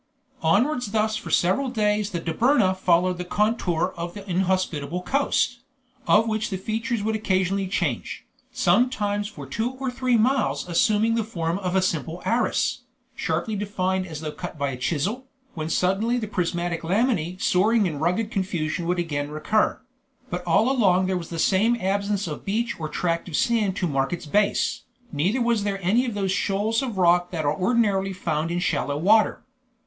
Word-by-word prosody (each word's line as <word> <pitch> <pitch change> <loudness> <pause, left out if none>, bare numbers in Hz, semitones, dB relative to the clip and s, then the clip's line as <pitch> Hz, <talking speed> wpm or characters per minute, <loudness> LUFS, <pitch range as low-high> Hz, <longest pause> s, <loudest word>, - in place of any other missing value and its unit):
Onwards 225 - +1
thus 215 0 +1
for 220 - -6
several 225 +10 +2
days 210 -3 0
the 175 - -3
Dobryna 190 - +2
followed 180 0 +2
the - - -2
contour 185 -3 0
of 170 0 -5
the 205 -1 -9
inhospitable 180 -3 -1
coast, 260 -1 +1 0.5
of 220 +2 +5
which 215 -1 -1
the 190 - -3
features 225 +3 -2
would 220 +1 0
occasionally 195 -2 0
change, 200 - -2 0.3
sometimes 205 -5 +1
for 150 -10 -9
two 225 - -2
or 260 0 -4
three 250 -1 +1
miles 220 - +1
assuming 210 +6 +2
the 230 -1 +1
form 170 -4 -2
of 185 -1 -2
a 190 - +3
simple 165 -1 -2
arris, 245 +3 +1 0.4
sharply 170 +7 -2
defined 190 -2 -1
as 155 -3 -7
though 155 -1 -4
cut 175 +1 -7
by 140 -1 -1
a - - -5
chisel, 180 - -2 0.3
when 155 -1 -4
suddenly 195 +8 +1
the 225 -3 -3
prismatic 175 -3 -2
lamellae 185 -2 0
soaring 210 +5 +3
in 155 -5 -3
rugged 180 +8 0
confusion 175 -4 -2
would 180 +1 +1
again 145 -4 -2
recur; 155 +8 0 0.5
but - - -3
all 245 +4 +3
along 190 -8 +3
there 190 0 0
was 170 -2 -4
the 165 - -5
same 210 +8 +3
absence 200 +1 0
of 155 -3 -6
beach 230 +3 -2
or 155 -1 -4
tract 170 +2 -1
of 160 - -4
sand 215 -3 +1
to 190 - -1
mark 135 -3 0
its 175 -2 -4
base, 205 +7 +1 0.3
neither 180 - 0
were 235 -1 +2
there 200 -1 -1
any 230 +8 +2
of 230 - -3
those 195 -2 -1
shoals 205 +4 0
of 245 -7 -4
rock 175 -1 +3
that 160 -4 -3
are 145 - +2
ordinarily 195 -1 +1
found 165 -3 -2
in 170 - -1
shallow 145 -5 -1
water. 210 +7 +3
190 Hz, 175 wpm, -24 LUFS, 170-220 Hz, 0.5 s, of